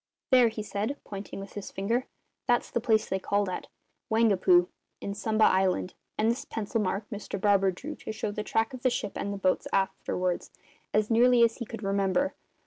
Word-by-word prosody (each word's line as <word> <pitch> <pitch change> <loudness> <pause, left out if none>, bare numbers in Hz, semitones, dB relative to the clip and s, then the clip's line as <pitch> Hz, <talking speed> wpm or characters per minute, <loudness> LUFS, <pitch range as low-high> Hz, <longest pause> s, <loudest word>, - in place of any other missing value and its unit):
"There," 250 -2 +7
he 220 -1 -4
said, 210 +7 -2
pointing 200 -1 -7
with 195 0 -9
his 205 - -6
finger, 230 +6 -1 0.4
"that's 240 -1 +2
the - - +1
place 220 -2 +2
they 190 - -1
called 200 +1 0
at 185 - -5 0.4
Waingapu, 190 -5 +4 0.3
in 200 - -4
Sumba 215 +2 +1
Island; 185 -1 +3 0.2
and 220 +2 +3
this 245 +4 -3
pencil 220 +1 -2
mark 200 +1 -2
Mr 205 -1 -5
Barber 195 -1 +4
drew 270 - -5
to - - -6
show 215 -1 -3
the 210 - -3
track 225 +3 0
of 255 - -7
the 255 - +3
ship 205 -4 -2
and 200 - -3
the 200 - -3
boat 185 -1 +1
afterwards 185 -2 -1 0.4
as 215 +1 +1
nearly 240 +1 +6
as 230 -1 +3
he 235 - -5
could 225 -2 -7
remember. 195 +8 +1
210 Hz, 195 wpm, -28 LUFS, 195-230 Hz, 0.4 s, There